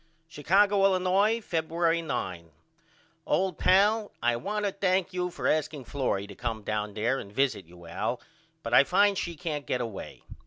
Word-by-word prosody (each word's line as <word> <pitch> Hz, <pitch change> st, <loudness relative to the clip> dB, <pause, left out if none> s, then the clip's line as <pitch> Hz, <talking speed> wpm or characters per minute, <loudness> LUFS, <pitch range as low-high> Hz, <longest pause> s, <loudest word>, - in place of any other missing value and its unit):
Chicago, 195 Hz, +6 st, +2 dB
Illinois, 195 Hz, +4 st, +3 dB
Febuery 165 Hz, -3 st, 0 dB
9. 90 Hz, -, -4 dB, 0.8 s
OLD 185 Hz, -3 st, 0 dB
PAL: 205 Hz, +3 st, +3 dB
I 120 Hz, 0 st, +1 dB
want 205 Hz, -, -3 dB
to 200 Hz, -, 0 dB
thank 185 Hz, -1 st, 0 dB
you 180 Hz, 0 st, -1 dB
for -, -, -3 dB
asking 150 Hz, -3 st, -1 dB
Florrie 120 Hz, -7 st, -2 dB
to 100 Hz, -, -11 dB
come 115 Hz, 0 st, -4 dB
down 105 Hz, -1 st, -3 dB
there 120 Hz, +5 st, 0 dB
and 100 Hz, -, -9 dB
visit 130 Hz, -5 st, 0 dB
you 85 Hz, 0 st, -15 dB
Al 85 Hz, -, -3 dB, 0.4 s
but 115 Hz, -, -4 dB
I 125 Hz, -, +8 dB
find 200 Hz, +6 st, +3 dB
she 175 Hz, -2 st, -3 dB
can't 155 Hz, -4 st, -4 dB
get 125 Hz, -, 0 dB
away. 115 Hz, -5 st, -7 dB
160 Hz, 165 wpm, -28 LUFS, 115-190 Hz, 0.8 s, I